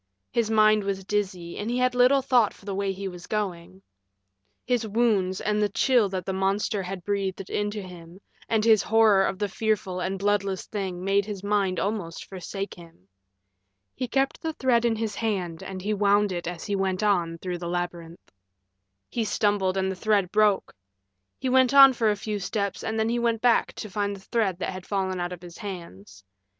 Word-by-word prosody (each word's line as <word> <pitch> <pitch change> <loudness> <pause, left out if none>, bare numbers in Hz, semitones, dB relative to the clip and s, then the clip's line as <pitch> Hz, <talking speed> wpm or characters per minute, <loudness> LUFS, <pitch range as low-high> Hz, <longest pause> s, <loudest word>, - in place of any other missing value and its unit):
His 230 -2 0
mind 215 -1 +4
was 195 -1 -3
dizzy, 190 -4 -3
and 210 - -3
he 245 - -1
had 250 0 +2
little 250 +2 +4
thought 240 -6 +3
for - - -19
the 200 - -3
way 195 0 -1
he 195 +1 -5
was 180 -1 -9
going. 190 -3 -4 0.8
His 240 -3 0
wounds 205 -4 +1
and 210 0 0
the 210 - +2
chill 235 0 +3
that 185 -2 -4
the 190 - -2
monster 195 +2 0
had 185 -1 -6
breathed 200 -2 -1
into 205 0 -2
him 175 -1 -12 0.3
and 220 -1 +2
his 220 -2 +6
horror 220 -3 +4
of 195 - -1
the 205 +1 -1
fearful 200 -3 -1
and 190 +1 -2
bloodless 200 -1 0
thing 190 -4 -4
made 195 +1 +2
his 200 -2 -6
mind 200 -2 +1
almost 195 -5 -3
forsake 195 +1 -6
him. 165 - -16 0.9
He 255 - -4
kept 270 +3 0
the 320 0 -3
thread 250 -5 +2
in 230 -1 +2
his 220 -1 -3
hand 185 -7 -2
and 185 -1 -7
he 210 +2 0
wound 205 0 +3
it 175 -2 -4
as 175 -1 -5
he 205 - -1
went 190 0 -1
on 175 -5 +1
through 180 0 -5
the 170 0 -5
labyrinth. 175 -1 -5 0.8
He 235 - -2
stumbled 205 -3 +1
and 190 0 0
the - - -4
thread 200 -1 +1
broke. 210 -2 +2 0.6
He 260 - -3
went 260 +1 +4
on 275 -1 +10
for 230 -3 +1
a 210 - +2
few 210 0 -4
steps 200 -1 -3
and 220 - -2
then 220 +1 +1
he 240 +1 0
went 230 -1 0
back 240 -2 +3
to - - -7
find 200 0 -2
the - - -11
thread 195 -3 0
that 190 - -3
had 185 0 -9
fallen 190 -2 -1
out 175 0 -2
of 180 -1 -8
his 175 -1 -11
hands. 105 - -9
200 Hz, 200 wpm, -26 LUFS, 185-215 Hz, 0.9 s, on